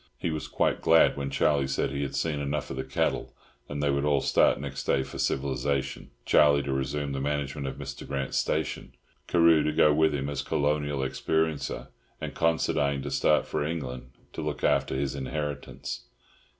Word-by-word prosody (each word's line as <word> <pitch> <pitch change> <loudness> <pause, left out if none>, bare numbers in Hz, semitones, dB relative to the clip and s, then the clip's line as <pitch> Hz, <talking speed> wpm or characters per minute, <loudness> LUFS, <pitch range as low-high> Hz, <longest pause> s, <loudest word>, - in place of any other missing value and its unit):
He 85 - -2
was 75 -2 -4
quite - - 0
glad 80 0 +5
when 70 -1 -3
Charlie 70 0 +2
said 70 0 -1
he 70 +1 -3
had 70 - -3
seen 75 -3 -1
enough 70 0 -2
of - - -4
the 65 - -3
cattle, 65 - -1 0.3
and 75 0 -3
they 70 - +3
would 70 0 0
all 75 -1 +3
start - - +3
next 70 0 -5
day 65 - +2
for - - -9
civilisation—Charlie 70 +1 +1
to 70 -1 -2
resume 70 +2 -2
the 70 0 -3
management 70 0 -2
of 65 - -4
Mr. - - -7
Grant's 70 -1 -1
stations, 80 -3 -2 0.3
Carew 85 -2 +5
to 75 - +1
go 75 0 +5
with 80 0 +3
him 70 0 -2
as 70 -1 -2
"colonial 75 -1 0
experiencer," 80 +3 -1 0.3
and - - -5
Considine 70 -4 +1
to - - -4
start - - +3
for - - -2
England 65 -6 -4 0.2
to - - -5
look - - -4
after - - +2
his 70 -1 -1
inheritance. 70 +1 -4
70 Hz, 180 wpm, -28 LUFS, 70-75 Hz, 0.3 s, glad